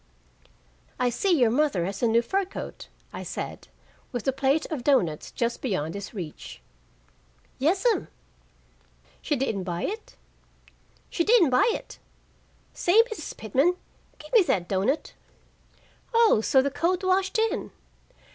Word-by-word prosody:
"I 250 -1 +2
see 395 - -1
your 240 -5 +4
mother 250 - +1
has 195 +2 -5
a 240 - +3
new 230 +1 +3
fur 390 +10 0
coat," 380 - -8 0.3
I - - -6
said, - - -6 0.4
with 245 -3 -3
the 270 - +1
plate 275 +3 +1
of 285 -6 -3
doughnuts 180 - +1
just 235 0 -2
beyond 165 - -2
his 200 -1 -6
reach. 175 -9 -8 1.0
"Yes'm." 380 - +2 1.1
"She 300 - 0
didn't 245 -7 -1
buy 175 -1 -3
it?" 435 +2 -5 1.0
"She 340 - +1
didn't 400 - +5
buy 400 - +4
it. - - -9 0.7
Say, 360 +5 +3
Mrs. 355 -8 -6
Pitman, 270 - +1 0.4
gimme 340 +8 +3
that 175 - 0
doughnut." 200 - -1 1.0
"Oh, 455 - +5
so 265 +2 +4
the 280 - -1
coat 355 +6 0
washed 380 +4 +1
in!" 445 0 0
275 Hz, 135 wpm, -26 LUFS, 220-370 Hz, 1.1 s, didn't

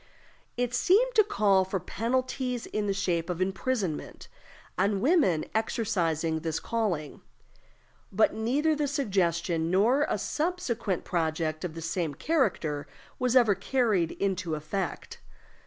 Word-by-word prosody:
It 245 0 -1
seemed 410 - +3
to 435 - +6
call 205 - +3
for 190 +1 -2
penalties, 250 +5 -2
in 210 -1 -2
the - - +1
shape 180 -4 -1
of 180 -1 -3
imprisonment, 190 -2 -2 0.5
on 200 0 +1
women 240 - +3
exercising 170 -8 0
this 160 -1 -2
calling. 190 -11 -2 0.9
But 215 +3 +3
neither 275 +8 +1
this 290 -2 -1
suggestion, 170 - 0
nor 230 +11 +3
a - - 0
subsequent 245 - -2
project 160 -1 -1
of 170 -3 -4
the 165 - -6
same 165 -3 -2
character 160 - 0 0.3
was 250 -1 +1
ever 235 -5 +6
carried 200 -4 +1
into 190 -4 -1
effect. 165 +5 -4
200 Hz, 125 wpm, -28 LUFS, 170-250 Hz, 0.9 s, to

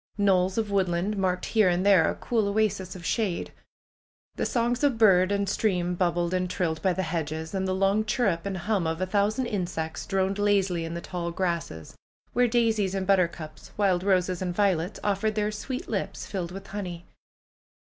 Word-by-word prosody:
Knolls 190 -1 +2
of 215 -2 -1
woodland 190 +1 0
marked 185 -2 0
here 215 -5 +3
and 180 +2 0
there 195 -5 +5
a - - -2
cool 225 -4 0
oasis 200 -3 0
of 175 -2 -9
shade. 210 -7 -1 0.8
The - - -1
songs 240 +2 0
of 275 -5 +3
bird 190 -4 +5
and 200 0 0
stream 180 -4 0
bubbled 175 -1 0
and 180 0 0
trilled 165 -4 -1
by 190 -2 +2
the 190 - -2
hedges. 160 0 -3
And 190 -1 -1
the 185 - 0
long 195 +3 +2
chirrup 205 -6 0
and 195 -1 -3
hum 195 -2 0
of 160 +1 -2
a 185 - 0
thousand 210 +6 +1
insects 175 -7 -3
droned 195 0 0
lazily 195 -5 +1
in 165 +1 -5
the 170 - -4
tall 175 -1 -4
grasses, 170 - -3 0.4
where 245 0 +3
daisies 225 -5 +1
and 190 -1 -1
buttercups, 170 -5 -1
wild 190 -4 +2
roses 185 -2 +1
and 180 -2 -2
violets, 185 -2 +1
offered 210 +1 0
their 210 0 0
sweet 255 +5 -5
lips - - -3
filled 180 -4 -4
with 195 +1 -8
honey. 180 -4 -6
190 Hz, 185 wpm, -27 LUFS, 175-205 Hz, 0.8 s, there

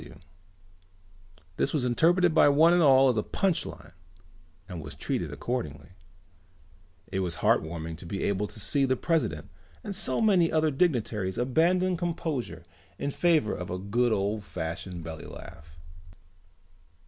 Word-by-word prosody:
F.W." - - -13 1.4
This - - 0
was 145 -5 0
interpreted 170 +7 +3
by 150 - +6
one 160 +4 +5
and 175 - +4
all 135 -3 +6
as 120 - 0
a - - +2
punch 185 - -1
line - - -11 0.8
and 90 -4 -7
was - - -8
treated - - -3
accordingly. 115 - -4 1.2
It 95 - -1
was 90 -3 -2
heartwarming 80 0 0
to 85 - -10
be 95 +3 -4
able 100 +1 0
to 110 - -13
see 140 +7 +1
the 130 0 +1
president 165 +4 -1 0.3
and 205 -2 -4
so 130 -7 +1
many 190 -7 +3
other 155 -1 +2
dignitaries 115 - 0
abandon 175 +9 +2
composure 155 - -3 0.3
in 140 - -3
favor 160 -9 +2
of 90 - -6
a 90 - -3
good 115 +6 0
old 105 0 -1
fashioned 85 0 -6
belly 80 -1 -8
laugh. 75 +1 -12
125 Hz, 150 wpm, -27 LUFS, -, 1.4 s, by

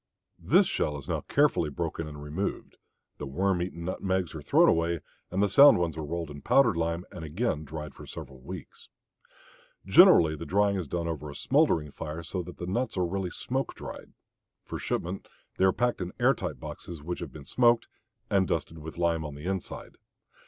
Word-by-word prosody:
This - - +4
shell 75 - -1
is 70 - -10
now - - -1
carefully 140 - +2
broken 80 +1 -3
and 75 -1 -8
removed; 80 +7 -4 0.4
the 75 - -4
worm 90 +6 0
eaten 85 -1 -4
nutmegs 95 -1 -1
are 80 - -6
thrown - - +5
away 85 0 +2 0.3
and 95 +3 +1
the - - +4
sound 140 +9 +8
ones 85 -2 -1
are 80 - -4
rolled 80 +1 -4
in 70 -1 -9
powdered 135 -9 +4
lime 85 +1 -1
and 85 - -8
again 80 0 -1
dried 75 +1 -7
for - - -12
several 65 -1 -9
weeks. 85 +5 -10 1.0
Generally 80 -2 +7
the 85 - -6
drying 100 +1 +2
is 90 -5 -3
done 85 +3 -2
over 75 -2 -4
a 70 - -9
smoldering 130 - +2
fire 80 +2 -6
so 90 +2 -3
that 90 0 -10
the 85 - -5
nuts 115 +5 -2
are 90 - +2
really 95 +1 -2
smoke 130 +9 -3
dried. - - -9 0.5
For - - -5
shipment 90 +3 -3 0.3
they 95 - +4
are 95 - +6
packed 120 0 0
in 90 0 -4
air - - +5
tight - - -5
boxes 85 -4 -8
which 90 +3 -4
have 85 -6 -6
been 70 0 -11
smoked 120 - +3 0.4
and 95 -2 +2
dusted 80 0 -2
with 80 +2 -8
lime 85 -2 +1
on 75 -2 -6
the 75 +3 -9
inside. 95 -1 -5
85 Hz, 195 wpm, -28 LUFS, 75-95 Hz, 1.0 s, sound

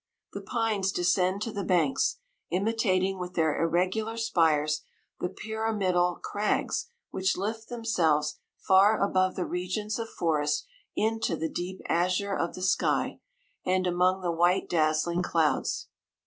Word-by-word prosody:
The - - -5
pines 220 -5 0
descend 185 +2 +1
to 230 - -3
the 200 -2 -3
banks, 175 - +2 0.3
imi 200 +6 +1
tating 190 -4 +1
with 180 0 -6
their 160 -3 +1
irregular 185 +7 0
spires, 155 -8 +2 0.4
the 180 - -1
pyramidal 195 -4 0
crags 210 - -1 0.2
which 190 0 0
lift 220 +4 -4
themselves 165 -11 +1 0.2
far 195 +3 +4
above 185 -2 +2
the 180 - -2
regions 185 +5 -3
of 225 0 -4
forest 150 - 0 0.3
into 220 -5 0
the 160 0 -2
deep 180 +2 -5
azure 185 +3 +1
of 170 - -2
the 185 - -6
sky, 190 - +1 0.4
and 185 0 +1
among 180 +1 +2
the 175 -2 0
white 175 +2 +2
dazzling 160 +2 +1
clouds. 160 -5 0
185 Hz, 135 wpm, -28 LUFS, 170-210 Hz, 0.4 s, far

